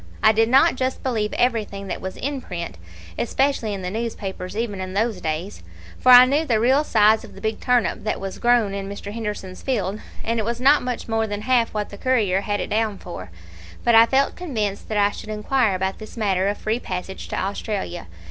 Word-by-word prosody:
I 220 - +7
did 225 +1 +2
not 260 0 +5
just 260 0 -2
believe 220 -5 -1
everything 215 -5 0
that 195 - -5
was 190 0 -6
in 275 0 -3
print, 170 - -6 0.4
especially 250 - 0
in 195 -2 -5
the 180 - -3
newspapers, 200 -4 -4
even 215 -4 -2
in 185 0 -6
those 215 -2 0
days; 160 +5 -4 0.4
for 255 - +5
I 250 0 +11
knew 285 +5 +1
the 235 -8 +1
real 260 +6 +3
size 220 -4 +4
of - - -12
the - - -10
big 220 0 -2
turnip 250 -2 +1
that 215 - -2
was 195 -1 -6
grown 235 -4 +3
in 195 0 -4
Mr. 200 0 -7
Henderson's 210 -4 -5
field, 210 -6 -1 0.2
and 230 +1 -1
it - - 0
was 235 +2 -2
not 275 +4 +5
much 250 -1 -4
more 225 -1 0
than 205 0 -4
half 245 -2 +2
what 210 -1 -2
the 200 - -11
'Courier' 215 -7 +2
had 205 0 -2
it - - -4
down 215 -2 0
for, 90 - -8 0.5
but 235 - +3
I 225 +1 +8
felt 270 +2 +2
convinced 215 - -3
that 215 - -1
I 205 0 +3
should 215 - -9
inquire 215 0 +1
about 190 +1 -2
this 215 +2 -10
matter 195 -3 +1
of 205 - -1
free 220 +2 -1
passage 185 -2 -6
to - - -4
Australia. 195 - -3
215 Hz, 215 wpm, -22 LUFS, 195-240 Hz, 0.5 s, I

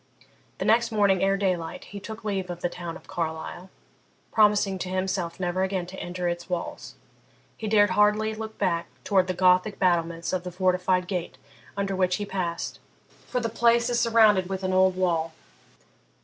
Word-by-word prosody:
The - - -3
next 230 +1 +3
morning 200 -4 +3
ere 195 0 +2
daylight 185 -4 -2
he 205 - -8
took 220 +3 -8
leave 195 -3 -2
of 175 0 -6
the 175 - 0
town 170 -2 -6
of - - -19
Carlisle, 165 +2 -5 0.6
promising 205 -3 +3
to 180 - -4
himself 185 -2 -2
never 180 0 -1
again 190 -1 -1
to 190 +2 -9
enter 175 0 -3
its 175 +1 -3
walls. 180 -1 -5 0.6
He 220 - -5
dared 205 -2 +4
hardly 210 +2 +3
look 220 0 -7
back 170 -1 0 0.2
towards 190 -3 +2
the 185 - -2
Gothic 185 +3 +3
battlements 170 -2 0
of 185 - 0
the 180 0 -7
fortified 180 0 +1
gate 180 -3 -4 0.4
under 195 -1 -1
which 185 -1 +2
he 205 - -3
passed, 180 -4 -3 0.5
for 250 - -1
the 235 - -1
place 235 +1 +2
is 240 - +2
surrounded 215 -5 +4
with 190 0 -4
an 185 0 0
old 185 0 +4
wall. 165 -3 0
185 Hz, 175 wpm, -26 LUFS, 180-205 Hz, 0.6 s, dared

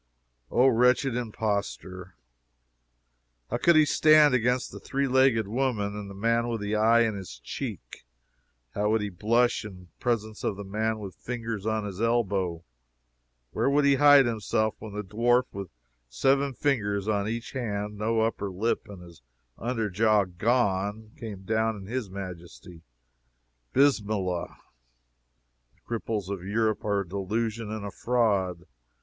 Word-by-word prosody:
O, 125 - +3
wretched 125 +1 +3
impostor! 100 -5 -3 1.4
How - - +1
could 170 - +4
he 155 -1 +6
stand 155 -1 +5
against 125 +1 +1
the - - -9
three 140 0 -1
legged 130 -5 +3
woman, 110 -3 -1
and 105 -1 -6
the 100 - -9
man 115 +3 +1
with 115 -3 -3
his 105 +1 -2
eye 115 +2 +4
in 115 -2 +2
his 95 -10 -8
cheek? - - -7 0.7
How 105 +1 0
would 110 0 +2
he 105 - -2
blush 115 +7 +1
in 90 -4 -11
presence 110 -3 -2
of - - -1
the 100 - -6
man 110 +3 -1
with 100 -3 -7
fingers 115 -4 -5
on 110 -1 0
his 100 0 -6
elbow? 100 -7 0 0.9
Where - - +1
would 145 +1 +3
he 140 - +5
hide 145 -1 +7
himself 110 -1 0
when 110 -2 -9
the 105 0 -4
dwarf 120 +5 +2
with 100 -2 -6 0.4
seven 135 - +1
fingers 105 -8 0
on 105 -1 0
each 115 +2 -4
hand, 105 -5 -3
no 110 +2 0
upper 110 -3 -1
lip, 105 +6 -1
and 100 -3 -10
his 85 -5 -15 0.4
under 115 -2 -1
jaw 105 +1 +3
gone, 105 +1 0
came 105 -4 -8
down 110 +2 0
in 100 -2 -9
his 115 0 -4
majesty? 90 -2 -9 0.9
Bismillah! 105 -10 +1 1.2
The - - -35
cripples 110 -4 -3
of 100 -3 -4
Europe 110 +2 0
are 100 -1 +1
a 95 - -7
delusion 105 +4 -2
and 110 -1 -5
a 100 - -5
fraud. 100 -8 0
110 Hz, 150 wpm, -27 LUFS, 100-120 Hz, 1.4 s, hide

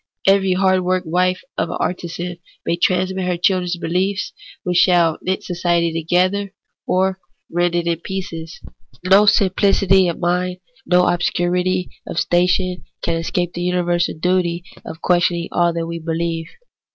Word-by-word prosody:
Every 195 -1 +4
hard 190 0 +3
worked 185 0 0
wife 180 +3 +1 0.2
of - - 0
an - - -3
artisan 175 0 -4 0.3
may 170 - +1
transmit 185 +2 0
to 180 - -2
her 180 -1 0
children 180 0 +1
behefs 185 +4 -1 0.3
which 180 -1 0
shall 170 -3 +4
knit 185 0 -2
society 170 -2 0
together, 185 +4 0 0.3
or 190 +1 +1 0.3
rend 175 0 +1
it 170 -1 0
in 170 -1 0
pieces. 170 -4 -6 0.5
No 195 +3 +6
simplicity 195 -2 +4
of 170 - -2
mind, 180 +1 -1 0.3
no 180 0 +4
obscurity 180 +1 0 0.2
of - - -6
station, 180 +1 +1 0.2
can 165 - 0
escape 175 +1 -2
the 175 - -5
universal 175 -1 0
duty 175 0 0 0.2
of 160 - -9
questioning 175 -1 +1
all 175 0 +2
that 165 0 -3
we 170 0 -5
beheve. 165 0 -2
180 Hz, 150 wpm, -19 LUFS, 170-185 Hz, 0.5 s, No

